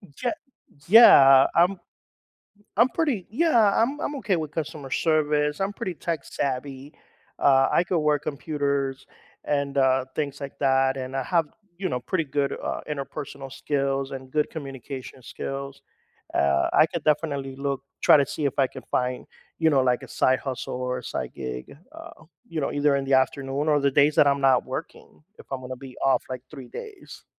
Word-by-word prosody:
Je 245 0 -1 0.6
yeah, 135 - +8
I'm 180 +2 +3 1.0
I'm 235 +4 +5
pretty 265 - -1
yeah, 235 -6 +3
I'm 275 +5 -1
I'm 290 - -3
okay 210 -8 0
with 155 -3 -4
customer 150 -3 -5
service, 150 -1 +1
I'm 195 +1 -1
pretty 205 -4 -5
tech 165 -2 -4
savvy. 135 +1 -4 0.4
Uh, 135 -1 +4
I 175 - +3
could 175 -1 0
work 150 -1 +1
computers 140 -2 -2 0.4
and, 140 -1 -1
uh, 130 -1 +3
things 145 -2 -3
like 140 - -8
that 135 -1 +2
and 130 +1 -5
I 135 - 0
have, 165 +3 +1 0.3
you 190 - -2
know, 125 - -2
pretty 165 +7 -2
good, 140 0 -1
uh, - - -3
interpersonal 140 -1 -6
skills 135 -1 -2
and 130 -1 -8
good 150 +1 0
communication 135 -3 -8
skills. 135 +2 -6 0.5
Uh, 70 -1 +2
I - - +7
could 165 0 -5
definitely 140 -3 -1
look 140 -1 -3 0.2
try - - +7
to 140 - +2
see 150 - -4
if 140 - -1
I 135 - +4
can - - -11
find, 125 0 -1 0.3
you 160 -1 +3
know, 140 - +3
like, 125 -1 +1
a - - -10
side 130 0 +2
hustle 130 -3 -5
or 125 0 -3
a - - -8
side 65 - -5
gig, 65 - -7 0.2
uh, 330 - -12 0.2
you 165 -2 -4
know, 140 - -2
either 145 -1 +2
in 135 - -2
the 135 - +2
afternoon 135 +2 0
or 150 -1 +3
the 140 0 +2
days 145 +2 +3
that 145 - +6
I'm 140 0 +2
not 130 -2 +4
working, 140 +3 -8 0.2
if - - -14
I'm 135 -1 -3
gonna 130 0 -6
be 130 -1 -12
off, 135 - +3
like, 130 -1 -5
3 135 -5 -10
days. 430 -4 -10
140 Hz, 185 wpm, -25 LUFS, 135-155 Hz, 1.0 s, yeah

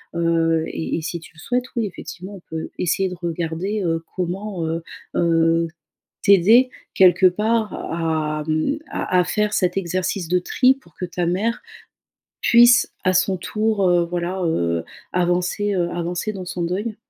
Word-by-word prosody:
heu, 165 -1 +2
et 160 - -3
et - - -3
si 170 +1 -3
tu 165 - -15
le - - -16
souhaites 245 +8 -1
oui 230 -2 0
effectivement 190 0 -8
on 190 - -12
peut 160 0 -5
essayer 185 +2 +1
de 180 - -6
regarder, 170 +4 -3
heu, 165 -2 0
comment, 185 0 -3
heu, 165 +1 -2 0.3
heu, 165 0 +2 0.6
t'aider 210 +6 +6 0.3
quelque 185 -1 +6
part 215 +4 0
à 155 -2 -2
mmh, 155 - 0
à 180 - 0
à - - +4
faire 210 +1 0
cet 180 0 +1
exercice 185 0 -2
de 180 +1 +3
tri, 255 +8 +3
pour 170 - -23
que 180 - -3
ta 175 0 -2
mère, 210 +7 0 0.8
puisse 240 +1 +6
à 185 - +3
son 190 +1 +2
tour, 215 0 0
heu, 175 -1 +3
voilà, 175 +2 -3
heu, 85 - 0 0.3
avancer, 180 +3 0
heu, 175 -2 0
avancer 175 +4 -3
dans 190 -3 -6
son 175 -1 -4
deuil. 205 +6 -2
180 Hz, 165 wpm, -21 LUFS, 165-200 Hz, 0.8 s, t'aider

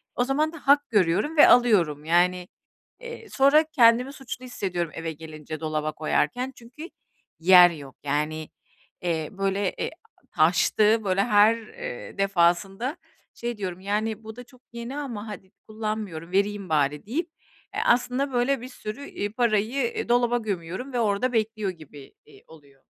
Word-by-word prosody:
O 245 - +2
zaman 300 +5 0
da - - -8
hak 285 0 +4
görüyorum 210 - +1
ve 295 - +9
alıyorum. 175 -12 +4
Yani, 180 +2 +2 0.5
eee, 470 -2 -9
sonra 280 +3 +4
kendimi 245 +3 +4
suçlu 255 -2 -8
hissediyorum 180 -9 -3
eve 165 0 -4
gelince 155 0 -9
dolaba 155 -1 -2
koyarken 245 - -1
çünkü 255 +8 -11 0.5
yer 180 +1 +8
yok. 140 -5 -10
Yani, 150 +2 -2 0.5
eee, 160 -3 -1
böyle, 195 0 -1
eee, - - -2 0.4
taştığı, 220 +1 +3
böyle 195 0 +2
her, 215 +1 +4
eee, 215 - -9
defasında 195 - +1 0.4
şey 235 -1 -4
diyorum, 185 -3 -5
"Yani, 215 +2 -2
bu 220 0 -9
da 245 - -9
çok 245 0 -21
yeni 235 +4 -6
ama 235 -7 -5
hadi 190 -3 -9 0.2
kullanmıyorum, 215 -6 -5
vereyim 200 0 0
bari" 150 -1 0
deyip, 315 - -3 0.5
eee, - - 0
aslında, 250 +3 +1
böyle, 250 +1 +1
bir 250 - -7
sürü, 240 +2 -7
iii, 205 0 -4
parayı, 235 +2 +1
iii, - - -4
dolaba 240 0 +3
gömüyorum 200 +3 -5
ve 245 - 0
orada 225 +3 0
bekliyor 215 -2 -1
gibi, 150 -5 -14
iii, 150 - -19
oluyor. 140 -4 -18
210 Hz, 150 wpm, -25 LUFS, 175-245 Hz, 0.5 s, ve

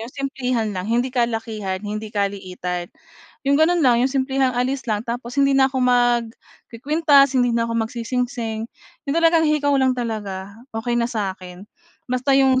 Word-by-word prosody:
yung 230 +3 -8
simplehan 255 -6 -2
lang, 185 - -3
hindi 240 +3 +1
kalakihan, 225 -6 -2
hindi 215 +1 -6
kaliitan, 185 -3 -3 0.6
yung 280 - +4
gano'n 335 +3 +3
lang, 245 -4 +4
yung 265 - 0
simplehang 265 -1 +1
alis 260 +2 -1
lang, 210 -2 0
tapos 240 +2 -5
hindi 275 0 +4
na 265 0 +5
ako 260 - -1
magkukuwintas, 250 +4 +2
hindi 245 -1 +3
na 230 - +1
ako 230 0 -2
magsisingsing, 230 -1 -3 0.4
yung 280 - 0
talagang 330 -1 +4
hikaw 290 -1 +2
lang 260 -1 +3
talaga, 205 -5 -4 0.2
okey 240 +1 -1
na 235 - 0
sa 210 -5 -2
'kin. 180 +1 -11 0.4
Basta 255 +2 +1
yung 265 -1 +4
245 Hz, 160 wpm, -21 LUFS, 220-270 Hz, 0.6 s, na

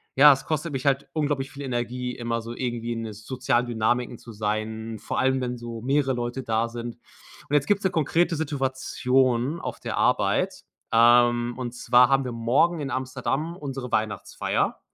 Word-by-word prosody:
ja, 145 +2 +9
es 135 - -6
kostet 155 0 -2
mich 135 0 -3
halt 140 0 +1
unglaublich 145 -3 -1
viel 140 - -9
Energie, 125 -1 -3
immer 115 -1 -2
so 115 +1 -7
irgendwie 120 -1 -3
in 115 - -4
'ne 110 -1 -6
sozialen 120 +3 -1
Dynamiken 120 +1 0
zu 115 - -12
sein, 110 +1 -3
vor - - -3
allem, 130 0 +2
wenn 125 -1 -3
so 115 -1 -7
mehrere 135 +2 +1
Leute 120 +2 -3
da 115 0 0
sind. 120 0 -6 0.5
Und - - -5
jetzt 145 -2 +4
gibt's 205 -1 +2
'ne 190 - +2
konkrete 165 +1 +1
Situation 130 -2 0
auf - - -5
der - - -4
Arbeit, - - +1 0.3
ähm, 120 +1 +5
und 125 -2 -4
zwar 125 0 +4
haben 135 0 +3
wir 125 - -3
morgen 125 +9 +2
in 135 -2 -4
Amsterdam 135 +5 -2
unsere 135 -4 -5
Weihnachtsfeier 110 -1 -1
125 Hz, 175 wpm, -25 LUFS, 120-135 Hz, 0.5 s, ja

